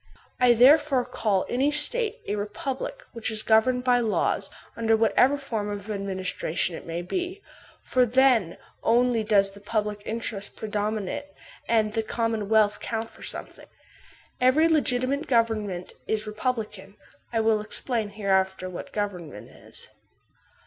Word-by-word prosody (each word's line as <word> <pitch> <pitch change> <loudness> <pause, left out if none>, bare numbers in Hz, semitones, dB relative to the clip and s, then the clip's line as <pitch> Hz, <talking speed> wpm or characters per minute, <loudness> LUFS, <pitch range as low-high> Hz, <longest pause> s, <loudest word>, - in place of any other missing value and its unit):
I 250 -1 +6
therefore 270 +1 +5
call 200 -4 0
any 265 +4 +1
State 435 +10 +2
a 205 - -1
republic 265 - -4
which 230 -2 -3
is 215 -1 +1
governed 250 +3 +3
THE - - -10
LAW 245 - +5
33 - - +1
by 225 - 0
laws, - - 0 0.2
under 225 -1 +2
whatever 250 +5 +3
form 225 -7 -4
of 205 +1 -5
administration 190 -3 -2
it - - -10
may 170 +1 -3
be; 365 - -4 0.4
for 255 - +2
then 245 -7 +3 0.2
only 240 -1 +2
does 200 -2 +3
the 200 - -14
public 210 0 -2
interest 215 -3 -5
predominate 215 +4 -3 0.4
and 215 -2 +2
the 225 - +1
commonwealth 220 -2 +1
count 225 0 -4
for - - -18
something. - - -8 0.7
Every 270 +6 +5
legiti 255 -6 +2
mate 280 +3 -2
government 215 -7 0
is 215 -1 -1
republican;* 210 -3 -4 0.4
I 230 - 0
will 220 -1 +2
explain 220 0 -2
hereafter 190 -2 0
what 175 - -8
government 180 - -5
is. - - -11
220 Hz, 145 wpm, -26 LUFS, 205-250 Hz, 0.7 s, I